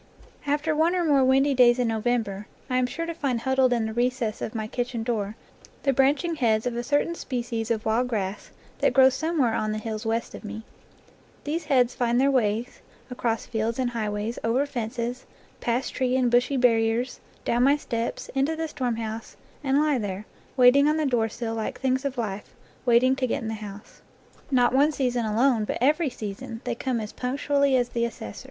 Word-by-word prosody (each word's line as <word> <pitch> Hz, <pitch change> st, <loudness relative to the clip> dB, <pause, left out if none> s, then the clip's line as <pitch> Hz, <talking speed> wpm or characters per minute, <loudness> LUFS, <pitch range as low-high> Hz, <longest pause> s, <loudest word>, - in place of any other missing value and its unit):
After 295 Hz, +2 st, +1 dB
one 325 Hz, +4 st, +2 dB
or 355 Hz, -2 st, +1 dB
more 280 Hz, -4 st, +4 dB
windy 270 Hz, +2 st, +4 dB
days 245 Hz, -2 st, +5 dB
in 250 Hz, -1 st, +1 dB
November 220 Hz, -3 st, -1 dB, 0.2 s
I 255 Hz, -, +2 dB
am 255 Hz, -1 st, +2 dB
sure 330 Hz, +6 st, -4 dB
to 335 Hz, -, -4 dB
find 265 Hz, -7 st, -1 dB
huddled 265 Hz, 0 st, +2 dB
in 235 Hz, -2 st, +1 dB
the 220 Hz, -, -4 dB
recess 240 Hz, -2 st, -1 dB
of 220 Hz, -, -4 dB
my 220 Hz, -1 st, -2 dB
kitchen 240 Hz, +1 st, -3 dB
door 215 Hz, -3 st, -2 dB, 0.5 s
the 275 Hz, -, +2 dB
branching 290 Hz, +6 st, +2 dB
heads 225 Hz, -4 st, +2 dB
of 245 Hz, -1 st, -1 dB
a 240 Hz, -, -1 dB
certain 290 Hz, +6 st, +1 dB
species 240 Hz, -7 st, -4 dB
of 220 Hz, -2 st, -1 dB
wild 230 Hz, +3 st, +1 dB
grass 205 Hz, -4 st, -3 dB, 0.3 s
that -, -, +2 dB
grows 265 Hz, 0 st, +6 dB
somewhere 300 Hz, -5 st, +1 dB
on 215 Hz, -1 st, -1 dB
the -, -, -2 dB
hills 215 Hz, 0 st, -4 dB
west 225 Hz, +1 st, -2 dB
of -, -, -9 dB
me* 220 Hz, +1 st, -7 dB, 0.8 s
These 320 Hz, +3 st, -3 dB
heads 255 Hz, -4 st, +3 dB
find 240 Hz, -1 st, +1 dB
their 275 Hz, +1 st, +4 dB
ways 230 Hz, -2 st, 0 dB, 0.3 s
across 230 Hz, -2 st, -1 dB
fields 225 Hz, 0 st, -2 dB
and 255 Hz, -2 st, 0 dB
high 220 Hz, -3 st, -2 dB
ways, 210 Hz, +3 st, -3 dB
over 245 Hz, +5 st, +2 dB
fences, 240 Hz, -1 st, -4 dB, 0.3 s
past 245 Hz, +2 st, -1 dB
tree 255 Hz, -1 st, 0 dB
and 250 Hz, -2 st, +2 dB
bushy 245 Hz, +3 st, +3 dB
barriers, 235 Hz, 0 st, +2 dB, 0.3 s
down 240 Hz, -, +1 dB
my 280 Hz, +3 st, +5 dB
steps, 235 Hz, -5 st, -3 dB
into 275 Hz, +4 st, +1 dB
the 320 Hz, 0 st, -2 dB
storm 250 Hz, -6 st, -2 dB
house, 225 Hz, 0 st, -6 dB, 0.3 s
and 270 Hz, 0 st, +2 dB
lie 300 Hz, -3 st, +2 dB
there, 200 Hz, -1 st, -4 dB, 0.3 s
waiting 260 Hz, +3 st, +6 dB
on 305 Hz, +1 st, +2 dB
the 310 Hz, -, 0 dB
doorsill 230 Hz, -2 st, -1 dB
like 220 Hz, -1 st, -4 dB
things 260 Hz, +1 st, 0 dB
of 275 Hz, -2 st, -2 dB
life, 210 Hz, -3 st, -4 dB, 0.3 s
waiting 250 Hz, +2 st, +5 dB
to 255 Hz, -, 0 dB
get -, -, 0 dB
into 220 Hz, -, -3 dB
the -, -, -2 dB
house. 205 Hz, 0 st, -10 dB, 0.5 s
Not 250 Hz, -3 st, +3 dB
one 285 Hz, +4 st, +4 dB
season 250 Hz, -5 st, -1 dB
alone, 230 Hz, +1 st, +2 dB
but -, -, -2 dB
every 300 Hz, +4 st, +2 dB
season, 225 Hz, +1 st, -7 dB
they 245 Hz, -, -2 dB
come 245 Hz, 0 st, -2 dB
as 215 Hz, -1 st, -6 dB
punctually 280 Hz, +2 st, +1 dB
as 245 Hz, -1 st, +1 dB
the 235 Hz, -1 st, 0 dB
assessor. 165 Hz, -, -7 dB
245 Hz, 200 wpm, -25 LUFS, 225-270 Hz, 0.8 s, grows